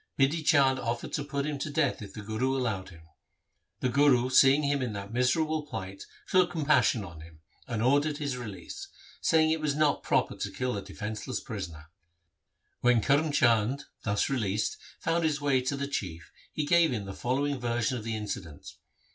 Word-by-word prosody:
Bidhi 145 +4 +2
Chand 140 -4 +4
offered 120 0 -3
to 145 - -1
put 140 -1 -3
him 150 -2 -3
to 150 - -3
death 145 -4 0
if 100 -2 -9
the 105 - -8
Guru 125 +6 -1
allowed 110 -8 -2
him. 85 -3 -15 0.8
The 130 - +1
Guru 130 -1 +4
seeing 135 +3 +6
him 140 -1 +1
in 120 -4 -2
that 100 +1 -7
miserable 150 +5 +1
plight 95 -5 -6 0.2
took 185 -2 +4
compassion 150 -7 +2
on 85 -5 -10
him, 80 -1 -15 0.3
and 115 -3 -2
ordered 145 +3 +2
his 145 -4 -2
release, 125 - -7 0.3
saying 160 -1 +4
it 160 0 0
was 150 -2 0
not 150 -1 +2
proper - - +1
to - - -4
kill 125 -2 -2
a 100 - -3
defenceless 105 +5 -5
prisoner. 85 -7 -7 0.9
When 125 -1 +4
Karm 145 +2 +3
Chand, 120 -1 +2 0.2
thus 100 0 0
released, 110 -6 -1 0.2
found 165 +1 0
his 155 -2 +1
way 140 -3 +2
to 135 +2 -2
the 140 0 -2
Chief 85 - -5 0.2
he 150 - -2
gave 170 +1 +4
him 110 -5 -3
the 95 - -6
following 140 +5 -1
version 120 +1 0
of 115 - -5
the 115 0 -3
incident. 95 -8 -6
130 Hz, 185 wpm, -29 LUFS, 105-145 Hz, 0.9 s, seeing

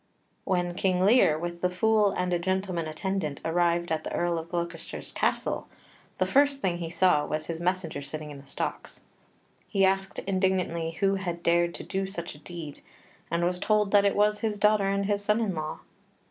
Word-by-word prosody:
When 175 -2 0
King 185 0 +1
Lear, 205 -8 +5
with 170 +1 -5
the 180 - +2
Fool 210 +3 +3
and 180 -2 -1
a 175 - +1
gentleman 185 -2 -1
attendant, 155 -2 -3
arrived 170 +1 +1
at 160 -1 0
the - - -5
Earl 175 -1 0
of 165 +1 -9
Gloucester's 170 -1 -4
castle, - - -1 0.5
the - - +2
first 280 0 +3
thing 175 -8 -1
he 165 -1 -4
saw 170 -3 +3
was 155 +1 -3
his 165 0 -5
messenger 175 -4 -1
sitting 150 +1 -6
in 140 - -9
the 140 - -16
stocks. - - -5 0.7
He 195 -2 +3
asked 195 0 0
indignantly 185 -4 0
who 195 0 +3
had 175 -3 -4
dared 170 0 +2
to - - -7
do 195 0 -2
such 175 -3 -4
a 150 - -14
deed, 160 -3 -8 0.5
and 170 +1 +1
was 180 0 0
told 210 0 +2
that 205 -1 +6
it 200 - +2
was 210 0 +3
his 215 -2 -1
daughter 210 -1 +3
and 200 0 0
his 205 0 0
son 210 +2 +2
in 215 -4 0
law. 155 -2 -4
180 Hz, 195 wpm, -27 LUFS, 170-195 Hz, 0.7 s, that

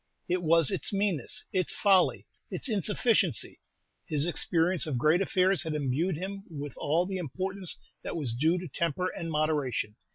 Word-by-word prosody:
It 180 0 0
was 165 -2 +3
its - - 0
meanness, 195 - 0
its 185 -3 +1
folly, 195 -3 +3 0.2
its - - 0
insufficiency. 220 +1 +1 0.5
His 150 -2 +1
experience 170 0 +1
of 140 -5 -1
great 155 +8 +3
affairs 190 -1 +2
had 160 -1 -2
imbued 150 +5 0
him 195 +3 -5
with 145 -3 -6
all 165 +5 +1
the 190 0 -3
importance 185 +3 -1 0.2
that - - -5
was 140 -8 0
due 160 +9 +2
to 180 0 -5
temper 170 +4 -1
and 165 - -6
moderation. 150 -8 -1
170 Hz, 160 wpm, -29 LUFS, 150-185 Hz, 0.5 s, was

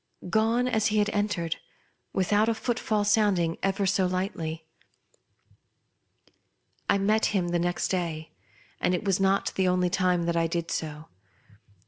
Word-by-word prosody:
Gone 225 +3 +2
as 220 -3 +1
he 215 -1 0
had 210 0 +2
entered, 205 -6 -1 0.5
without 205 +4 +2
a 230 - +1
footfall 220 -2 -1
sounding 205 -6 +2
ever 195 +1 0
so 190 -1 +2
lightly. 170 -4 -3 2.2
I - - +4
met 215 +3 +2
him 175 -2 0
the 175 0 0
next 175 +1 -1
day, 165 -4 -3 0.5
and 180 - +1
it 180 - -4
was 195 -2 +2
not 195 +1 +1
the 190 -1 +1
only 180 -1 +2
time 180 -2 +2
that 170 0 -1
I 165 0 +2
did 170 0 -3
so. 155 0 -4
190 Hz, 145 wpm, -27 LUFS, 170-210 Hz, 2.2 s, I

